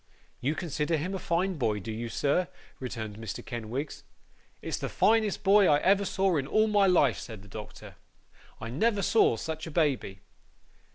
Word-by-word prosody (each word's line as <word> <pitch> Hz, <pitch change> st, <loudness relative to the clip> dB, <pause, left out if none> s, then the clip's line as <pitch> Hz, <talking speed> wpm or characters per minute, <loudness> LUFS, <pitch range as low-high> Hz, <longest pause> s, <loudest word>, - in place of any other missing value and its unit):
'You 140 Hz, +5 st, -1 dB
consider 160 Hz, -1 st, -1 dB
him 175 Hz, +6 st, -3 dB
a 190 Hz, -, -3 dB
fine 175 Hz, 0 st, -1 dB
boy, 110 Hz, -4 st, 0 dB
do 100 Hz, +3 st, -6 dB
you, 115 Hz, +2 st, -4 dB
sir?' 145 Hz, -, +1 dB, 0.3 s
returned 110 Hz, -5 st, -5 dB
Mr. 110 Hz, -3 st, -6 dB
Kenwigs. 120 Hz, +4 st, -5 dB, 0.6 s
'It's -, -, -3 dB
the -, -, -3 dB
finest 215 Hz, -2 st, +2 dB
boy 200 Hz, 0 st, +6 dB
I 145 Hz, -, +5 dB
ever 200 Hz, +1 st, +3 dB
saw 190 Hz, -3 st, +1 dB
in 135 Hz, -2 st, -2 dB
all 215 Hz, +7 st, +3 dB
my 205 Hz, -2 st, +3 dB
life,' 145 Hz, -9 st, +3 dB
said 110 Hz, -4 st, -9 dB
the -, -, -14 dB
doctor. 105 Hz, +1 st, -10 dB, 0.7 s
'I 115 Hz, -, -6 dB
never 205 Hz, -, +1 dB
saw 220 Hz, -, +4 dB
such 160 Hz, +6 st, -5 dB
a -, -, -5 dB
baby. 140 Hz, -, 0 dB
150 Hz, 175 wpm, -28 LUFS, 115-190 Hz, 0.7 s, boy